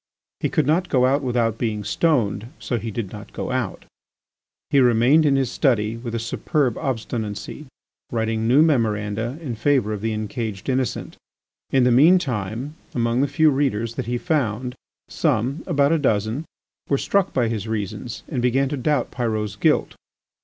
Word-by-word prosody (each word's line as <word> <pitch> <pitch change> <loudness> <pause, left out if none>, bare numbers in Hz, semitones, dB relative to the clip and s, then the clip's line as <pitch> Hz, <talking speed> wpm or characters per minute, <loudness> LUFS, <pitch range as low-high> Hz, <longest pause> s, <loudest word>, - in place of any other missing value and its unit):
He - - 0
could 155 -7 +1
not 170 +5 +1
go 125 -2 +3
out 140 +3 +2
without 120 -4 0
being 110 -3 -1
stoned, 115 -3 +1
so 120 - -2
he 115 - -5
did 105 -3 -4
not 105 -1 -10
go - - -4
out. 125 -6 -3 0.9
He 140 - +5
remained 125 +5 +5
in 140 - +3
his 135 -3 +1
study 115 -6 +1
with 115 0 -5
a - - +1
superb 125 +3 0
obstinacy, 115 +2 -4 0.4
writing 110 -1 -1
new 135 +6 +6
memoranda 115 -3 0
in 130 -6 -3
favour 115 -2 +1
of 105 - -5
the 110 +1 -1
encaged 110 -1 -4
innocent. 130 -3 -2 0.5
In 135 -2 +3
the 125 - +4
mean 155 +10 +7
time 120 - -3 0.2
among 120 +1 +1
the 140 - +2
few 155 +1 +3
readers 120 -5 0
that 125 -1 -4
he 120 0 0
found, 125 - -1 0.3
some, 130 +8 0
about 145 -4 +3
a 165 - +3
dozen, 110 +2 0 0.4
were 140 - +3
struck 195 +6 +1
by 120 -3 +1
his 110 -1 -3
reasons 110 +2 -4
and 130 -6 -2
began 130 +2 +2
to 145 - -3
doubt 140 0 0
Pyrot's 110 -5 -2
guilt. 100 - +2
120 Hz, 170 wpm, -22 LUFS, 110-140 Hz, 0.9 s, mean